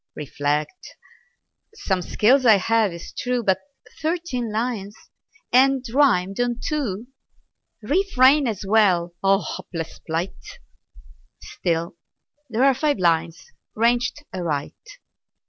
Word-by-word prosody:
Reflect. 150 Hz, -, -3 dB, 0.8 s
Some 190 Hz, -, -1 dB
skill 250 Hz, +8 st, +3 dB
I 220 Hz, -, +8 dB
have, 225 Hz, +2 st, +2 dB
'tis 170 Hz, -1 st, -10 dB
true; 250 Hz, -1 st, -2 dB
But 190 Hz, -3 st, +2 dB, 0.4 s
thirteen 310 Hz, -8 st, -2 dB
lines! 215 Hz, -2 st, -3 dB, 0.6 s
and 265 Hz, +1 st, +4 dB
rimed 195 Hz, -9 st, +2 dB
on 245 Hz, -1 st, 0 dB
two! 245 Hz, -, -3 dB, 0.7 s
"Refrain" 285 Hz, -, +3 dB
as 210 Hz, -3 st, -4 dB
well. 190 Hz, -5 st, +3 dB
Ah, 195 Hz, +1 st, +3 dB
Hapless 165 Hz, -2 st, -6 dB
plight! 170 Hz, +4 st, -5 dB, 0.8 s
Still, 170 Hz, 0 st, -3 dB, 0.5 s
there 230 Hz, +2 st, 0 dB
are 275 Hz, 0 st, +5 dB
five 295 Hz, +1 st, 0 dB
lines 165 Hz, -2 st, 0 dB, 0.2 s
ranged 235 Hz, +5 st, +1 dB
aright. 160 Hz, -6 st, -4 dB
220 Hz, 105 wpm, -22 LUFS, 180-255 Hz, 0.8 s, I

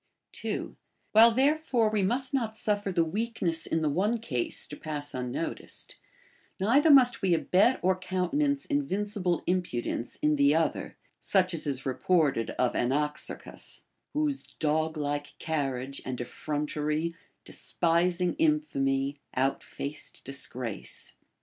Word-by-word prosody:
2. -, -, -4 dB, 0.4 s
AVliile 225 Hz, +1 st, +7 dB
therefore 265 Hz, -5 st, +2 dB
v/e 215 Hz, -2 st, +1 dB
must 255 Hz, +8 st, +1 dB
not 225 Hz, -5 st, -1 dB
suffer 205 Hz, -2 st, 0 dB
the 170 Hz, -2 st, +2 dB
weakness 180 Hz, -3 st, -2 dB
in 160 Hz, -, 0 dB
the 155 Hz, -, +2 dB
one 200 Hz, +10 st, +1 dB
case 130 Hz, -, -1 dB
to 150 Hz, -, -8 dB
pass 145 Hz, -1 st, -5 dB
unnoticed, 125 Hz, +5 st, -5 dB, 0.6 s
neither 265 Hz, +11 st, +4 dB
must 250 Hz, -4 st, +7 dB
Ave 185 Hz, -4 st, +2 dB
abet 205 Hz, +10 st, +3 dB
or 185 Hz, +1 st, +4 dB
countenance 275 Hz, +11 st, 0 dB
invincible 205 Hz, -, -1 dB
impudence 150 Hz, -10 st, -2 dB
in 150 Hz, 0 st, +3 dB
the 140 Hz, +1 st, +5 dB
other, 165 Hz, 0 st, -1 dB, 0.2 s
such 185 Hz, -2 st, +2 dB
as 160 Hz, -2 st, -4 dB
is 135 Hz, -2 st, -2 dB
reported 140 Hz, -3 st, +1 dB
of 125 Hz, -1 st, +2 dB
Anaxarchus, 150 Hz, +4 st, -3 dB
— -, -, -52 dB
Whose 295 Hz, -2 st, 0 dB
dosi 155 Hz, +1 st, 0 dB
like 145 Hz, 0 st, -3 dB
carriage 135 Hz, -4 st, -2 dB
and 130 Hz, -1 st, -4 dB
effrontery, 150 Hz, +4 st, -2 dB, 0.3 s
Despising 175 Hz, +1 st, +1 dB
infamy, 140 Hz, -, +1 dB, 0.2 s
out 135 Hz, +1 st, +1 dB
faceil 145 Hz, +2 st, -7 dB
disgrace. 130 Hz, -5 st, -3 dB
170 Hz, 125 wpm, -29 LUFS, 145-220 Hz, 0.6 s, AVliile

